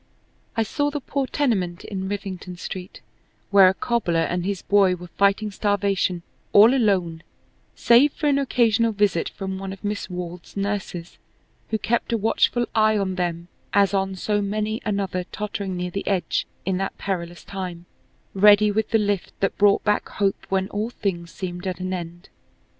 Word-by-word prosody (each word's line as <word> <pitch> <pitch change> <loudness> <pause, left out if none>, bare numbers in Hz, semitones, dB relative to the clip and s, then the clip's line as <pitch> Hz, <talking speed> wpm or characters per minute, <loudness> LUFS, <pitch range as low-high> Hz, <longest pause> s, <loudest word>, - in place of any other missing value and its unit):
I 225 - +3
saw 290 +7 -1
the 295 0 -3
poor 275 0 -2
tenement 190 -12 -1
in 190 -2 -4
Rivington 190 -3 -5
Street 180 +1 -7 0.5
where 195 -2 +8
a 190 - -1
cobbler 185 -10 0
and 180 +1 -1
his 195 -1 -3
boy 195 -2 +4
were 175 0 -11
fighting 200 +3 +1
starvation 200 -3 0 0.3
all 215 +5 +8
alone 190 -10 +1 0.5
save 250 +5 +5
for 305 - -4
an 280 -1 +3
occasional 230 -4 +2
visit 200 -5 +1
from 190 -1 -5
one 195 0 -5
of 195 - -10
Miss 205 0 -3
Wald's 180 0 -7
nurses 195 -4 -4 0.5
who 220 - 0
kept 235 +2 -1
a 230 - +2
watchful 225 +2 +2
eye 215 -1 +4
on 195 -2 -1
them 175 -2 -2 0.3
as 200 0 +4
on 195 -1 0
so 205 +2 0
many 215 +2 -2
another 195 -3 -1
tottering 200 -2 -4
near 180 0 -3
the 195 - -4
edge 190 -3 0 0.2
in 190 -1 0
that 195 0 -3
perilous 175 -3 -4
time, 180 -3 -6 0.5
ready 210 +1 +6
with 215 +1 0
the 225 - +4
lift 205 -3 -2
that 195 - 0
brought 205 0 +4
back 210 0 +1
hope 195 -1 -1
when 190 0 +1
all 215 +2 -2
things 175 -7 -3
seemed 180 +1 -6
at 185 0 -3
an 185 0 -3
end. 175 0 -6
195 Hz, 170 wpm, -23 LUFS, 180-210 Hz, 0.5 s, where